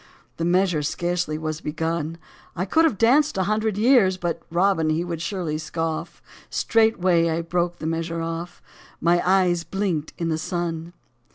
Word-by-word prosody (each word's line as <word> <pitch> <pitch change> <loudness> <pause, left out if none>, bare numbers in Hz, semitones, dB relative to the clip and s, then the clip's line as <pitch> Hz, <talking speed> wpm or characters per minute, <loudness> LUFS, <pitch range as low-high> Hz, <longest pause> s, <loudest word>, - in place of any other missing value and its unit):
The 165 - -1
measure 180 -2 +2
scarcely 175 +1 -1
was 155 0 -4
begun; 160 +1 -2 0.4
I 180 +1 -1
could 320 - +3
have 290 -11 +1
danced 280 +6 +3
a 190 - +2
hundred 215 +1 0
years 220 -4 +4
I - - -15
But 170 -1 -2
Robin, 170 -1 +2
he 155 +2 +1
would 170 -2 -4
surely 165 -4 -2
scoff 160 0 -4
— - - -21
Straightway 185 -7 +2
I 165 +1 -1
broke 175 +1 -1
the - - -7
measure 165 +1 -2
off: 165 +1 -5 0.4
My 175 +1 +3
eyes 180 -2 +3
blinked 180 -6 -2
in 170 -1 -2
the 160 -1 -1
sun. 170 0 -3
175 Hz, 170 wpm, -23 LUFS, 165-190 Hz, 0.4 s, years